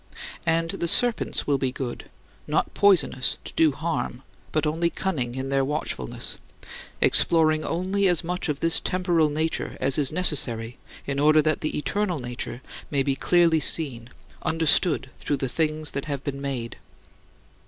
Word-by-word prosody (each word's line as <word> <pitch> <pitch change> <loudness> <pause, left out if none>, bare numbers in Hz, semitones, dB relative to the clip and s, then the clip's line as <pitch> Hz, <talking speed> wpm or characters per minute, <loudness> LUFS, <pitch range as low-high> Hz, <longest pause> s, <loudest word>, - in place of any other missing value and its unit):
And 165 0 +1
the 170 - -3
serpents 240 +6 +3
will 140 -2 +1
be 130 -1 -1
good, 125 -2 -6 0.4
not - - 0
poisonous 165 -10 +2
to - - -7
do 160 -2 +3
harm, 135 -4 -4 0.3
but 155 0 0
only 165 +3 0
cunning 130 -11 -3
in 130 0 -4
their 135 0 +1
watchfulness 135 - -3 0.6
exploring 155 -2 +4
only 190 +3 0
as 175 -3 +2
much 180 0 -3
of 145 -1 -3
this 165 0 +2
temporal 175 -4 +1
nature 155 +2 -2
as 135 +3 +2
is 140 -3 +3
necessary 125 -9 +1 0.3
in 140 0 -3
order 155 +1 +4
that 155 0 0
the 155 - -2
eternal 180 +5 -1
nature 120 0 -6 0.3
may 140 -2 +1
"be 135 -1 0
clearly 170 +2 +3
seen, 130 -7 +1 0.3
understood 160 -3 +2
through 145 - -1
the 135 - -2
things 155 +2 0
that 140 - -4
have 140 -3 -4
been 140 -1 -5
made." 130 -5 -4
150 Hz, 155 wpm, -24 LUFS, 135-165 Hz, 0.6 s, exploring